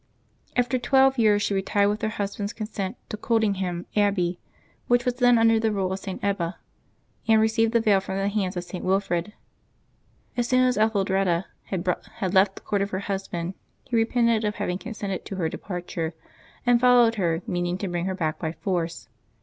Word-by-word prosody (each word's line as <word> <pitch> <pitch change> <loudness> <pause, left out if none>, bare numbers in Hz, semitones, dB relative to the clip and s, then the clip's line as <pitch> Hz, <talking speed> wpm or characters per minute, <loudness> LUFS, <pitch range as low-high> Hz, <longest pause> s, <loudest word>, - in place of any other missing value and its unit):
After 250 +1 +1
twelve 265 +1 +4
years, 210 -2 +4
she - - 0
retired 200 +1 +2
with 210 +1 -2
her 220 - 0
husband's 205 0 -3
consent 215 -1 -4
to 215 - -4
Coldingham 195 -6 0
Abbey, 195 -4 +1 0.5
which 245 0 +3
was 250 - +1
then 245 -1 +4
under 225 0 +4
the 220 0 +1
rule 190 -2 -1
of 190 - -4
St. 190 -2 -6
Ebba, 190 -4 -1 0.7
and 220 -1 +5
received 220 +1 +2
the 235 - +3
veil 210 -4 +4
from 190 0 -5
the 195 0 0
hands 200 -3 -1
of 175 - -2
St. 180 0 -7
Wilfrid. 190 0 0 1.0
As 240 -1 0
soon 255 0 +3
as 250 -1 +3
Etheldreda 195 -4 +1 0.2
had 185 -1 -3 0.5
left 195 0 +4
the - - -10
court 205 -1 -1
of 200 - -1
her 190 -1 -3
husband, 190 -3 -3 0.3
he 250 - -4
re 225 -1 +4
pented 235 -2 +2
of 210 -1 -1
having 180 +1 -2
consented 200 -5 -5
to 195 - -5
her 170 -4 -1
departure, 175 -3 -5 0.5
and 245 -1 +4
followed 245 -2 +6
her, 170 -1 0
meaning 175 0 -1
to 195 - -3
bring 175 -1 -2
her 190 0 -2
back 160 -4 -2
by 160 -1 -3
force. 170 -3 -3
200 Hz, 190 wpm, -25 LUFS, 185-225 Hz, 1.0 s, followed